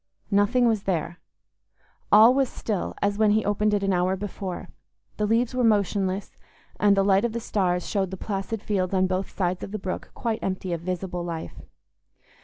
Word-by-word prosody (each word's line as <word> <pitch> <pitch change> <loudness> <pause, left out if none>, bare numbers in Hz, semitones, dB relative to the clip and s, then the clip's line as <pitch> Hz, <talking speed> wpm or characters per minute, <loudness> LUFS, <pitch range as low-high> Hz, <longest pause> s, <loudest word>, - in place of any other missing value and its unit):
Nothing 205 +5 +3
was 220 -3 0
there; 175 -1 -2 0.9
all 220 +4 +8
was 270 -1 +2
still, 210 -5 -3
as 205 +1 0
when 215 -1 +4
he 215 +1 +2
opened 210 +1 +1
it 205 -1 +1
an 195 -1 +1
hour 180 +1 +1
before; 190 -1 -6 0.5
the 210 - 0
leaves 230 +3 +1
were 255 -1 0
motionless, 200 -3 +1 0.4
and 205 -1 +4
the 195 - +4
light 195 0 +4
of 235 -2 -1
the 235 - -2
stars 180 -5 -1
showed 195 -3 0
the 190 - -6
placid 200 +2 -4
fields 190 -2 -1
on 185 0 +3
both 185 +1 -2
sides 180 -1 -2
of - - -6
the 215 - -3
brook 190 -2 -5
quite 225 -2 -2
empty 185 -1 -3
of 165 - -3
visible 180 0 -3
life. 165 -2 -6
195 Hz, 190 wpm, -25 LUFS, 185-215 Hz, 0.9 s, all